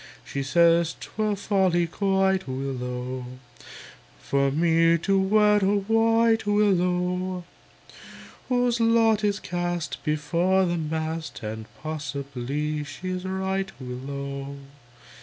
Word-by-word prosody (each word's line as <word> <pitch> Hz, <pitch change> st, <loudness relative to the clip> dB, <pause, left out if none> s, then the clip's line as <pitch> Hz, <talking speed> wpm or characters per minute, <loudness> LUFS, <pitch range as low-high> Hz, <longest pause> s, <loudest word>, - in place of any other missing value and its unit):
She 140 Hz, -, -4 dB
says, 170 Hz, +3 st, +3 dB
"'Twere 215 Hz, -1 st, -2 dB
folly 190 Hz, -4 st, +2 dB
quite, 190 Hz, +1 st, +1 dB
Willow! 130 Hz, -1 st, -4 dB, 1.0 s
For 140 Hz, -, +1 dB
me 165 Hz, +3 st, +3 dB
to 195 Hz, +4 st, +1 dB
wed 210 Hz, +1 st, +4 dB
a 195 Hz, +1 st, +3 dB
wight, 225 Hz, +2 st, +2 dB
Willow! 180 Hz, -2 st, +1 dB, 1.1 s
Whose 245 Hz, -1 st, +2 dB
lot 225 Hz, -2 st, +3 dB
is 205 Hz, 0 st, +1 dB
cast 175 Hz, -3 st, -3 dB
before 170 Hz, +5 st, +1 dB
the 175 Hz, -1 st, -1 dB
mast"; 160 Hz, -2 st, -4 dB
And 110 Hz, 0 st, -5 dB, 0.2 s
possibly 145 Hz, -1 st, -3 dB
she's 180 Hz, +6 st, -5 dB
right, 190 Hz, 0 st, -2 dB
Willow! 140 Hz, +2 st, -6 dB
175 Hz, 100 wpm, -25 LUFS, 145-195 Hz, 1.1 s, wed